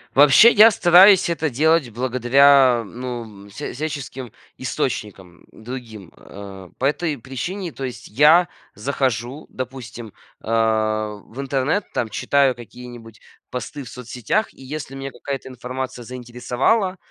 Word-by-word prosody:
Вообще, 150 - +7
я 220 +1 +8
стараюсь 190 0 +6
это 160 -2 -1
делать 155 +1 +2
благодаря, 130 +1 +4
ну, 120 +2 -6 0.2
м, - - -15
вся 105 - -7
всяческим 135 -4 -6 0.3
источникам 95 -4 -4
другим, 110 -5 -9
э. 95 -2 -11
По 130 - -2
этой 150 +1 -1
причине, 165 - -5
то 135 - -8
есть 125 -2 -7
я 155 +9 +5 0.3
захожу, 130 +2 -3
допустим, 120 -4 -8 0.3
а, 110 -1 0
в 125 +5 -8
интернет, 140 +8 -1
там 115 - -1
читаю 135 +5 +2
какие-нибудь 120 -2 -12 0.3
посты 140 +3 -6
в 120 - -11
соцсетях. 125 - -3
И - - -18
если 140 +1 -7
меня 135 0 -6
какая-то 135 -1 -6
информация 125 0 -6
заинтересовала, 125 - -1
130 Hz, 125 wpm, -21 LUFS, 115-145 Hz, 0.3 s, я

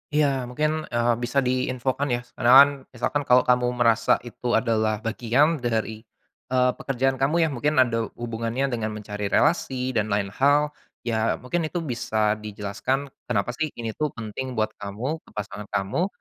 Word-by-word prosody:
Iya 150 0 +4 0.2
mungkin, 150 +5 0 0.2
eee, 120 0 +3
bisa 125 +3 +1
diinfokan 130 +2 -1
ya, - - -3
s - - -26
karena 120 - +3
kan 140 - +1 0.3
misalkan 145 +5 -1
kalau 125 0 +6
kamu 125 0 +3
merasa 115 -2 +3
itu 120 0 -7
adalah 110 -2 +1
bagian 125 +8 +2
dari, 110 -3 -2 0.5
eee, 125 0 +3
pekerjaan 135 0 0
kamu 135 +4 +1
ya, - - +3
mungkin 145 +4 0
ada 115 -2 -1
hubungannya 115 +3 -2
dengan 110 -3 -2
mencari 105 -1 -4
relasi 130 0 +1
dan 110 -4 0
lain 100 -1 -1
hal, 145 +2 +4 0.3
ya 115 -2 0
mungkin 155 +6 -2
itu 170 +1 -3
bisa 110 -3 0
dijelaskan 105 +6 -3 0.2
kenapa 120 -1 0
sih 160 - +1
ini 115 -1 -4
tuh 155 - +2
penting 115 +3 -5
buat 110 -1 0
kamu 115 +10 -4
ke - - -16
pasangan 105 0 -6
kamu, 100 - 0
120 Hz, 165 wpm, -24 LUFS, 110-135 Hz, 0.5 s, kalau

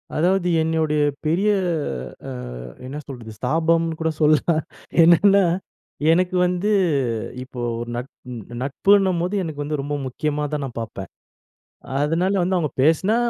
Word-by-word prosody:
அதாவது 180 +3 +2
என்னுடைய 160 -2 +1 0.2
பெரிய 180 +7 +2 0.8
அ - - -5 0.5
என்ன 135 +3 -6
சொல்றது? 120 -5 -8
ஸ்தாபம்னு 165 +4 +1
கூட 160 - +1
சொல்லலாம். 155 +1 +3 0.4
என்னன்னா, 195 +4 +6 0.7
எனக்கு 180 +2 +2
வந்து 180 +3 0 0.7
இப்போ 130 -1 -10 0.2
ஒரு 120 0 -5
நட் 125 +3 -5 0.5
நட்புன்னும்போது 185 +5 +2
எனக்கு 150 -3 -4
வந்து 150 0 -3
ரொம்ப 145 +1 -3
முக்கியமா 150 +3 -2
தான் 145 -1 -1
நான் 120 -3 -6
பார்ப்பேன். 105 -4 -7 0.9
அதனால 165 +6 +1
வந்து 185 +1 +1
அவங்க 155 -5 0
பேசுனா 165 +8 +3
160 Hz, 120 wpm, -22 LUFS, 145-180 Hz, 0.9 s, என்னன்னா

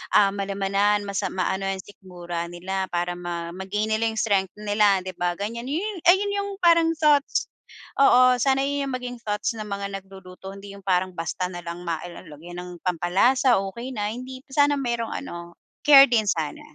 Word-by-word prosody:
um, 200 -1 +6
malamanan 200 +1 0
mas, 200 -1 -2
am - - -3
maano 190 +1 -1
yung 190 -1 -3
sikmura 175 -3 -7
nila 190 +2 -3
para 175 0 -1
ma 170 -1 -5
ma-gain 210 +3 -2
nilang 220 0 0
strength 195 -4 +1
nila, 205 -2 +3
di 185 - -5
ba 175 0 -1
ganyan. 235 +4 -4
Yun 365 +6 -3
ay 350 - +9
yun 405 - -2
yung 400 0 -3
parang 335 -1 +5
thoughts 295 -2 +2 0.5
oo, 255 -2 +6
sana 270 +2 +2
yun 285 0 -1
yung - - -4
maging 245 -1 -6
thoughts 210 +2 -2
ng 215 - -5
mga 200 -1 -4
nagluluto, 190 0 -11
hindi 200 0 -10
yung 200 - -17
parang 185 0 +2
basta 175 +2 -3
na 175 -1 -7
lang 170 +1 -6
ma 165 -1 0
el 175 - -9
el 180 - -16
lagyan 175 +4 -10
ng 180 - -9 0.2
pampalasa, 195 - +3
okey 235 +6 -6
na, 210 +1 -2
hindi 255 +1 -8
sana 290 0 +3
merong 235 -3 -2
ano, 170 0 -7 0.3
care 275 -2 +10
din 220 -4 +1
sana. 160 -4 -2
200 Hz, 190 wpm, -24 LUFS, 180-245 Hz, 0.5 s, care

